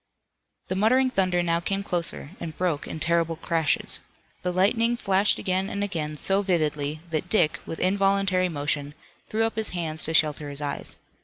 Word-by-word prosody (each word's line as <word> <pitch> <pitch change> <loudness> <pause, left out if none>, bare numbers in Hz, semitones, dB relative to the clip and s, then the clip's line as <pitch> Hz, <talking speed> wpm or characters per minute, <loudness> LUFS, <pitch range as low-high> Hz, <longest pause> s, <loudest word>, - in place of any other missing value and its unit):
The 185 - -2
muttering 255 +6 +3
thunder 185 -4 +2
now 170 -1 +1
came 195 +3 -2
closer 170 -5 -1
and 160 -2 -6
broke 175 -5 -1
in 160 - -5
terrible 165 0 +1
crashes. 160 -1 0 0.4
The 180 - -1
lightning 230 +6 +2
flashed 195 -2 +2
again 190 +1 -1
and 200 - -2
again 155 -6 -3
so 195 +6 +2
vividly 155 -5 0
that 165 +3 -2
Dick, 165 -7 +3
with 165 - -4
involuntary 195 -1 +2
motion, 145 -1 -2 0.3
threw 220 +1 +1
up 225 0 -3
his 220 -1 -1
hands 160 -2 -3
to 160 - 0
shelter 150 -1 +2
his 140 0 -5
eyes. 145 -1 -5
175 Hz, 170 wpm, -26 LUFS, 155-195 Hz, 0.4 s, muttering